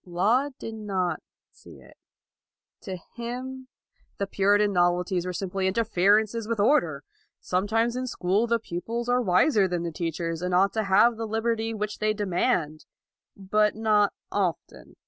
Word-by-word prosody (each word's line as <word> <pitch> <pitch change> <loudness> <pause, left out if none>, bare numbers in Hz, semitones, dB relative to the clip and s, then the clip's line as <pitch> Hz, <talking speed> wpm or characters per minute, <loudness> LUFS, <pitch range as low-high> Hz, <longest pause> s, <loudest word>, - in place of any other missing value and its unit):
Laud 225 +11 0
did 225 - -7
not 195 -5 -2 0.3
see - - -16
it. - - -18 0.9
To 190 -4 -6 0.2
him 255 +2 -6 0.5
the 200 - -1
Puritan 205 +1 +2
novelties 175 0 +1
were - - -2
simply 190 +1 -2
interferences 215 +2 +2
with 230 -2 -2
order. 175 - +2 0.4
Sometimes 225 +6 0
in 255 0 -3
school 200 0 0
the 235 0 +2
pupils 230 +4 -5
are 245 0 +2
wiser 200 - +3
than 175 -2 -2
the 170 - -3
teachers 165 0 -3
and 180 0 -1
ought 195 +2 +3
to 220 -2 -1
have 215 +4 +4
the 225 0 -4
liberty 225 +1 -1
which 210 0 -4
they 215 0 +1
demand: 180 -5 -1 0.5
but 210 +2 +1
not 215 -2 +2 0.2
often. 185 -5 -3
205 Hz, 145 wpm, -26 LUFS, 180-225 Hz, 0.9 s, have